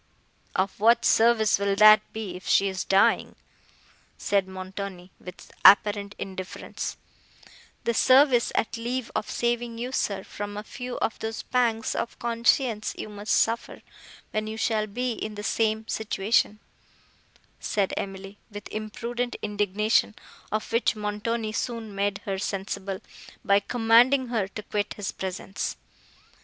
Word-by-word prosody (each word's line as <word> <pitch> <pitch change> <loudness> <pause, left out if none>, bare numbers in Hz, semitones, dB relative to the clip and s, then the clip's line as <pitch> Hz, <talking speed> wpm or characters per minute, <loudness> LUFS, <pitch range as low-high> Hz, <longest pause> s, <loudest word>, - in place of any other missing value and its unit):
"Of 190 +1 -1
what 230 +3 +4
service 220 -3 +4
will 200 0 +1
that 215 +1 +8
be, 215 -5 -5
if 180 - -10
she 200 - +4
is 190 -1 -3
dying?" 195 0 +3 0.8
said 200 -2 +1
Montoni, 190 -1 -7
with 180 0 -11
apparent 205 0 +6
indifference. 190 -1 -6 0.9
"The 235 - 0
service, 255 0 +5
at 225 - 0
leave, 240 +1 -3
of - - -2
saving 240 -1 -1
you, 245 +2 -4
sir, 200 -7 -1
from 205 0 -6
a 210 - -5
few 250 +3 -6
of 225 - -1
those 220 0 -4
pangs 235 -3 0
of 235 - -4
conscience 235 -1 +1
you - - -6
must 205 0 -5
suffer, 230 +1 +1 0.5
when 215 0 -2
you 220 0 -5
shall 220 -2 0
be 245 +4 -2
in 215 -1 -5
the 205 - -6
same 220 +1 0
situation," 215 -1 +1 1.0
said 200 -2 -1
Emily, 195 +1 -6
with 205 -1 -8
imprudent 235 +3 -4
indignation, 210 +1 +1 0.4
of 215 +1 -2
which 230 0 +2
Montoni 215 +2 -2
soon 225 -1 -4
made 200 0 -1
her 195 -1 -2
sensible, 195 -1 -4 0.4
by 200 -1 +5
commanding 240 +4 +4
her 220 -5 0
to 210 +2 -8
quit 205 0 -2
his 205 -2 -4
presence. 190 +1 -4
215 Hz, 140 wpm, -26 LUFS, 200-230 Hz, 1.0 s, that